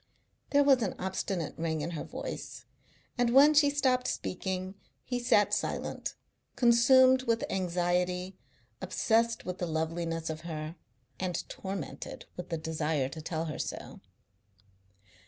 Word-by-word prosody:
There 285 0 +5
was 270 -3 +5
an 205 - -1
obstinate 185 -3 -2
ring 160 -2 -1
in 165 +4 -3
her 160 - -4
voice, - - -7 0.5
and 245 -1 +3
when 280 +5 +7
she 295 -1 +6
stopped 260 -3 +1
speaking 185 0 -3 0.3
he 245 -1 -2
sat 240 -4 +3
silent, - - -2 0.4
consumed 255 +2 +6
with 230 0 +1
anxiety, 180 0 0 0.5
obsessed 230 0 +1
with 180 0 -4
the 175 - -1
loveliness 165 0 -2
of 155 0 -6
her, 155 -1 -5 0.4
and 180 -2 -2
tormented 190 -5 -6
with 180 0 -7
the 165 - -1
desire 155 -3 -1
to 160 - -8
tell 160 +1 -3
her 155 - -5
so. - - -5
180 Hz, 135 wpm, -30 LUFS, 165-235 Hz, 0.5 s, when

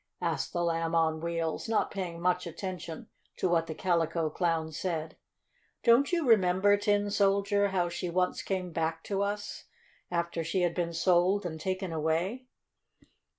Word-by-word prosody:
asked - - -1
the 175 - -1
Lamb 165 0 0
on 160 -1 +2
Wheels, 165 +3 -2
not 225 - +1
paying 180 -4 -4
much 180 +1 +1
attention 170 -1 -6 0.3
to - - +1
what 165 -2 +2
the 160 - -5
Calico 165 -3 0
Clown 165 -2 0
said. 160 -1 -3 0.7
"Don't 240 +6 +5
you 340 -5 +1
remember, 200 -2 +5
Tin 205 0 +1
Soldier, 200 0 +2
how 185 -3 0
she 175 +1 -4
once 180 +1 0
came 185 -2 -3
back 165 0 -2
to 200 -1 -2
us, 205 +1 -3 0.4
after 170 -1 -1
she 180 +3 -1
had 175 -1 +1
been 170 -1 -1
sold 180 +3 +3
and 160 -2 -4
taken 185 -1 -2
away?" 170 +11 -1
175 Hz, 155 wpm, -30 LUFS, 165-195 Hz, 0.7 s, Don't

